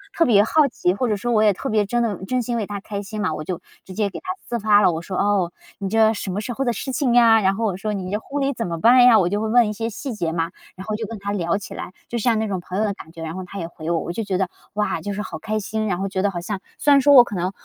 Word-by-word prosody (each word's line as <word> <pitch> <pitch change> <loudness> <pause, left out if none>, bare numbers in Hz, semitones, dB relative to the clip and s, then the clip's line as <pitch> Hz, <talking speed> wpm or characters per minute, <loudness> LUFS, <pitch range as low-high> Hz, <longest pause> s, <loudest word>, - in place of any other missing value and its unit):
特 335 - +4
别 205 -4 +5
好 295 +5 +3
奇， 180 -7 0
或 250 +5 -1
者 210 - +1
说 240 +4 -2
我 215 - +3
也 215 -1 +5
特 270 - -6
别 215 -1 +2
真 240 +2 +1
的 200 -5 -3
真 255 -1 0
心 240 +1 -2
为 215 -3 -2
她 205 -1 -5
开 200 0 -5
心 215 +2 -7
嘛， 185 -6 0
我 155 - -5
就 175 +1 -4 0.2
直 185 - -11
接 205 0 0
给 - - -7
她 370 - -10 0.2
私 235 -1 -2
发 210 -1 +5
了， 180 - +4
我 160 0 -4
说 190 -1 0 0.3
你 195 -1 -3
这 220 0 +4
什 205 -2 -5
么 200 - -2
时 245 +3 -4
候 270 - -2
的 240 - +2
事 265 +5 -4
情 255 -2 +1
呀， 225 -2 +6
然 195 0 +2
后 225 +1 -1
我 195 - 0
说 210 +1 -3
你 190 -1 -4
这 210 - -1
婚 285 +5 -4
礼 275 0 0
怎 230 -5 -3
么 165 -1 -4
办 245 +5 +6
呀？ 235 -3 +8
我 175 - +3
就 205 +2 -1
会 220 - -1
问 235 0 +4
一 210 - -3
些 225 +2 -3
细 255 +4 -6
节 170 -7 -2
嘛， 165 +1 -2 0.2
然 190 - -9
后 215 -1 -2
就 220 0 -4
跟 225 0 -7
她 200 +1 -4
聊 175 -2 0
起 190 -3 -8
来， 185 - -7
就 235 - -3
像 230 0 +2
那 220 - -1
种 190 -3 -2
朋 180 +2 -6
友 215 - +2
的 205 -2 0
感 160 - -13
觉， 165 -1 -9
然 160 0 -5
后 185 - -5
她 200 - -9
也 165 - -4
回 165 -1 -7
我， 170 -1 +1
我 170 - -4
就 225 +5 -3
觉 190 -3 -1
得， 190 -2 0 0.2
哇， 210 0 -1
就 205 - -4
是 210 - -3
好 - - -6
开 215 0 -2
心， 215 +2 -3
然 180 - 0
后 195 +2 -2
觉 190 -1 -1
得 205 - +2
好 175 - -4
像 195 +2 -4 0.2
虽 290 - +2
然 280 - +6
说 285 +2 +5
我 250 -3 +10
可 205 - -7
能， 180 +1 -1
210 Hz, 365 characters per minute, -22 LUFS, 185-230 Hz, 0.3 s, 我